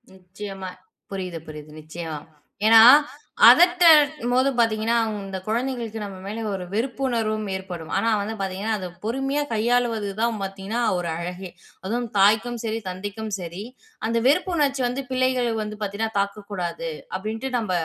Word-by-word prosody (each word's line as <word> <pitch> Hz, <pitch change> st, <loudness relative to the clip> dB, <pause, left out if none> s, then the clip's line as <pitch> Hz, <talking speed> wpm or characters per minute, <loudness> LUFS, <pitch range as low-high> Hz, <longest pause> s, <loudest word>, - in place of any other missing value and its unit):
நிச்சயமா. 190 Hz, +1 st, -8 dB, 0.4 s
புரியுது, 180 Hz, -4 st, -4 dB
புரியுது. 150 Hz, 0 st, -10 dB
நிச்சயமா. 155 Hz, -1 st, -6 dB, 0.5 s
ஏன்னா 225 Hz, 0 st, +8 dB, 0.7 s
அதட்டமோது 300 Hz, -7 st, +6 dB
பார்த்தீங்கன்னா, 225 Hz, 0 st, +2 dB, 0.3 s
இந்த 190 Hz, -1 st, -5 dB
கொழந்தைகளுக்கு 235 Hz, -1 st, -2 dB
நம்ம 200 Hz, -2 st, -7 dB
மேலே 225 Hz, +2 st, -4 dB
ஒரு 190 Hz, -2 st, -4 dB
வெறுப்புணர்வும் 225 Hz, -3 st, -1 dB
ஏற்படும். 180 Hz, -4 st, -7 dB
ஆனா 230 Hz, -, +1 dB
வந்து 220 Hz, +2 st, -4 dB
பார்த்தீங்கன்னா, 195 Hz, +3 st, -2 dB
அதை 185 Hz, -2 st, -5 dB, 0.2 s
பொறுமையா 270 Hz, +5 st, -1 dB
கையாளுவது 230 Hz, -2 st, +1 dB
தான் 230 Hz, -2 st, 0 dB
பார்த்தீங்கன்னா, 195 Hz, +4 st, -4 dB, 0.2 s
ஒரு 175 Hz, -1 st, -3 dB
அழகே! 180 Hz, +1 st, -6 dB, 0.3 s
அதுவும் 235 Hz, +3 st, -2 dB
தாய்க்கும் 220 Hz, +4 st, +3 dB
சரி, 225 Hz, +1 st, -2 dB
தந்தைக்கும் 205 Hz, +4 st, -6 dB
சரி, 175 Hz, +3 st, -6 dB, 0.4 s
அந்த 230 Hz, 0 st, 0 dB
வெறுப்பு 315 Hz, +6 st, +2 dB
உணர்ச்சி 275 Hz, -4 st, +1 dB
வந்து 260 Hz, +3 st, -3 dB
பிள்ளைகளுக்கு 250 Hz, -4 st, +1 dB
வந்து 215 Hz, 0 st, -7 dB
பார்த்தீங்கன்னா, 210 Hz, +2 st, -3 dB
தாக்கக்கூடாது 200 Hz, -, -3 dB, 0.3 s
அப்டின்ட்டு, 225 Hz, +6 st, -4 dB
நம்ம 210 Hz, -5 st, -3 dB
220 Hz, 130 wpm, -23 LUFS, 195-245 Hz, 0.7 s, ஏன்னா